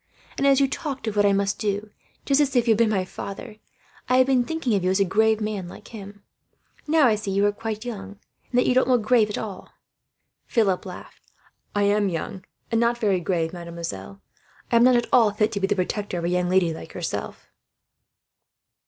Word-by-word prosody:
And 280 - +1
as 275 -1 +5
you 275 - +4
talked 275 -2 -5
of 220 -2 -3
what 205 0 +4
I - - +4
must 200 0 0
do, 205 0 -2 0.3
just 280 +1 +3
as 275 -2 0
if 240 -1 +3
you - - +5
had 220 - +2
been 230 -2 +4
my 190 -3 0
father, 210 +4 -8 0.5
I 255 - +4
have 260 - +6
been 260 -2 +3
thinking 320 -4 -2
of 195 -3 +1
you 185 - +2
as 190 +1 +1
a 195 - +4
grave 220 +3 +2
man, 210 -4 -3
like - - -12
him. 205 -2 -10 0.6
Now 310 -1 +4
I 235 - +4
see 210 -1 -3
you 200 +1 +2
are 205 - +3
quite 220 +1 -5
young, 200 -4 -7 0.3
and 245 - -1
that 250 - +4
you - - +3
don't 255 0 +3
look 250 -4 +3
grave 220 -1 +3
at 210 - -4
all." 205 -4 -7 0.8
Philip 200 -5 +1
laughed. 180 - -11 0.5
"I 205 - +2
am 205 0 +2
young, 185 +2 -5 0.3
and 230 0 +2
not 235 0 +2
very 205 -5 +1
grave, 170 -2 -1
mademoiselle. 165 - -7 0.5
I 235 - +5
am 230 - +5
not 255 0 +6
at 240 -1 +2
all 230 -4 +6
fit 210 +1 +1
to 200 - -2
be 195 - +1
the 205 - +1
protector 200 0 -2
of 170 - -4
a - - 0
young 180 0 0
lady 180 -3 +2
like - - -10
yourself." - - -5
210 Hz, 225 wpm, -24 LUFS, 190-235 Hz, 0.8 s, have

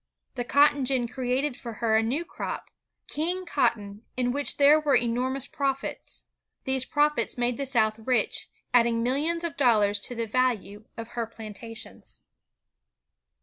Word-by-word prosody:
The 245 - -2
cotton 285 +2 +4
gin 255 -2 +2
created 255 +2 -1
for 235 -2 -7
her 220 0 +1
a 220 - +5
new 265 +10 -1
crop, - - -6 0.4
''King 355 +5 -2
Cotton,'' 220 -9 0 0.2
in 245 -1 +1
which 285 +2 -1
there 290 +2 +7
were 295 -3 +2
enormous 250 +3 0
profits. 275 -1 -3 0.4
These 265 -1 +2
profits 295 -1 +1
made 245 0 0
the 275 -1 -2
South 220 -4 +2
rich, 225 -1 0 0.2
adding 235 -1 +4
millions 305 +7 0
of 335 -4 -3
dollars 210 -6 +3
to 245 +5 -3
the 230 0 -1
value 220 -3 -1
of 230 0 -6
her 235 -1 -3
plantations. 225 0 -8
245 Hz, 145 wpm, -27 LUFS, 230-280 Hz, 0.4 s, there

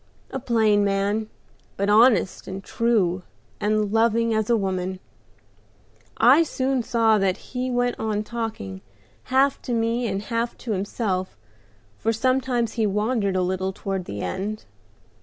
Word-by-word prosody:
A 265 - -3
plain 220 -5 +3
man, 200 +2 0 0.5
but 200 - 0
honest 215 -2 +4
and 190 +1 -6
true, 200 -7 +1 0.4
and 210 -1 +1
loving 230 0 +3
as 220 0 0
a 235 - +4
woman; 185 -2 -2 1.2
I 255 +8 +6
soon 265 -4 0
saw 225 -2 +3
that 190 -1 +1
as - - -18
he 255 0 -1
went 245 0 0
on 215 -1 -1
talking, 215 - -5 0.4
half 270 +2 +2
to 245 - -4
me 230 +1 0
and 195 -1 -2
half 230 +2 -2
to 235 - -5
himself, 195 -1 -2 0.6
for 225 - +1
sometimes 250 0 0
he 225 -3 +1
wandered 210 -1 0
a 185 - +2
little 190 +1 -1
toward 190 -1 -4
the 100 - -6
end. 200 - -4
220 Hz, 145 wpm, -24 LUFS, 195-235 Hz, 1.2 s, I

